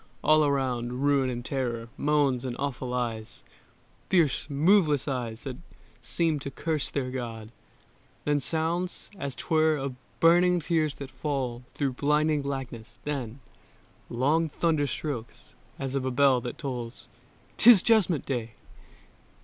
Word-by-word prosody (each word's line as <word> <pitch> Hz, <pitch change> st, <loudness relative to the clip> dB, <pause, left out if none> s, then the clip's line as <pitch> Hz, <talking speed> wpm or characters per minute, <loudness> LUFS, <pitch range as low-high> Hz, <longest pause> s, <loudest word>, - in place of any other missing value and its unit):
All 155 Hz, 0 st, +5 dB
around 130 Hz, -3 st, -1 dB
Ruin 140 Hz, -2 st, +3 dB
and 120 Hz, -1 st, -5 dB
terror, 120 Hz, -4 st, -2 dB
moans 145 Hz, -4 st, +1 dB
and 125 Hz, -2 st, -3 dB
awful 130 Hz, -3 st, -3 dB
eyes, 120 Hz, -2 st, -3 dB, 0.7 s
Fierce, 160 Hz, -5 st, +2 dB
moveless 150 Hz, -1 st, +3 dB
eyes 120 Hz, -4 st, -3 dB
that 130 Hz, -3 st, -5 dB, 0.4 s
seem 155 Hz, +6 st, +1 dB
to 140 Hz, -, -5 dB
curse 155 Hz, +2 st, -2 dB
their 130 Hz, -3 st, -2 dB
God: 115 Hz, -4 st, -6 dB, 0.7 s
Then 145 Hz, 0 st, +2 dB
sounds, 165 Hz, +5 st, -1 dB
as 140 Hz, -2 st, -4 dB
'twere, 155 Hz, -2 st, +2 dB
of 135 Hz, -1 st, -3 dB, 0.3 s
burning 175 Hz, +2 st, +5 dB
tears 160 Hz, -3 st, 0 dB
that 140 Hz, -2 st, -8 dB
fall 130 Hz, -3 st, -3 dB
Through 140 Hz, -2 st, -1 dB
blinding 150 Hz, +2 st, +2 dB
blackness: 130 Hz, -4 st, -6 dB
then 135 Hz, -4 st, -4 dB, 0.7 s
long 150 Hz, +7 st, +1 dB
thunder 155 Hz, -2 st, +1 dB
strokes 125 Hz, -3 st, -5 dB, 0.2 s
As 135 Hz, -1 st, -4 dB
of 135 Hz, -1 st, -1 dB
a 130 Hz, -, 0 dB
bell 130 Hz, -1 st, +4 dB
that 120 Hz, 0 st, -6 dB
tolls 125 Hz, -4 st, -5 dB, 0.5 s
"'Tis 230 Hz, -5 st, +8 dB
Judgment 195 Hz, -, +3 dB
Day!" 115 Hz, -4 st, -3 dB
140 Hz, 135 wpm, -27 LUFS, 125-155 Hz, 0.7 s, Tis